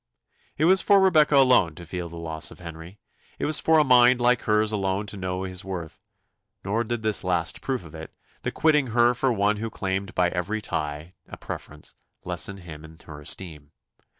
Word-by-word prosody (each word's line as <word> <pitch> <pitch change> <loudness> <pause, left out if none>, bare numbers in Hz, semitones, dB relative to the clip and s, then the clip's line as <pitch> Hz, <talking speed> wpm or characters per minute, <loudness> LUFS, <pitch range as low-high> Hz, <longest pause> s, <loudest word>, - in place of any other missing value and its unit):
It 155 - +2
was 190 +2 +4
for 200 -1 +5
Rebecca 160 -6 +4
alone 125 - +4
to 85 - -10
feel 90 0 -6
the 85 - -11
loss 80 -1 -1
of - - -13
Henry; 85 +2 -10 0.4
it - - -3
was 155 -1 +3
for 160 0 +3
a 155 - +5
mind 125 -1 +5
like 120 0 +3
hers 105 0 +2
alone 100 -1 -1
to 105 - -7
know 95 -1 -4
his 95 0 -4
worth; 90 -4 -7 0.7
nor 110 +4 0
did 120 0 -4
this 110 -1 +1
last 85 -3 -1
proof 130 -9 -3
of 80 - -13
it, 80 0 -9 0.3
the - - -3
quitting 150 -4 +2
her 120 +1 +3
for 130 +1 0
one 105 -1 +1
who 115 +2 -4
claimed 95 -1 -4
by 90 -1 +2
every 90 +5 -3
tie 75 -3 -4 0.2
a - - -9
preference, 75 0 -8 0.3
lessen 90 +2 -2
him 80 -5 -11
in 80 0 -14
her 75 -2 -10
esteem. 75 -2 -4
95 Hz, 200 wpm, -25 LUFS, 85-120 Hz, 0.7 s, for